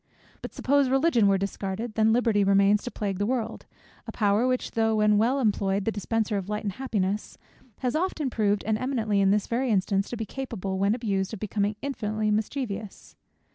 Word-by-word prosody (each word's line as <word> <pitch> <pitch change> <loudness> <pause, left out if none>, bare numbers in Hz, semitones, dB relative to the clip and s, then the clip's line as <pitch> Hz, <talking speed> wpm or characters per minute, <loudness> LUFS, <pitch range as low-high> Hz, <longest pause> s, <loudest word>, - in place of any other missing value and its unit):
But - - -6
suppose 280 0 +2
Religion 265 -5 +3
were 195 0 +4
discarded, 200 +3 -4
then 220 0 +3
Liberty 225 -3 +3
remains 200 +1 +4
to - - -4
plague 200 -4 -3
the 205 - +1
world; 245 -2 -3 0.4
a - - -4
power 210 +2 +2
which 255 0 -1
though 225 -1 +1
when 210 -1 +3
well 250 +5 +2
employed, 200 -4 0
the 225 - +1
dispenser 215 0 -1
of 195 0 -5
light 210 0 -2
and 205 - -1
happiness, 210 -5 -2 0.4
has 250 -1 0
been 310 - +1
often 320 -7 -1
proved, 205 -3 +1
and 215 0 0
eminently 225 -6 0
in 195 - +4
this 205 +1 +2
very 250 +2 -1
instance, 195 -1 +1
to 240 - -5
be 225 - -3
capable 200 -6 -4
when 200 +3 +2
abused, 200 -5 -2
of - - -11
becoming 210 0 -1
infinitely 215 -6 -1
mischievous. 215 -1 -4
215 Hz, 195 wpm, -26 LUFS, 200-240 Hz, 0.4 s, were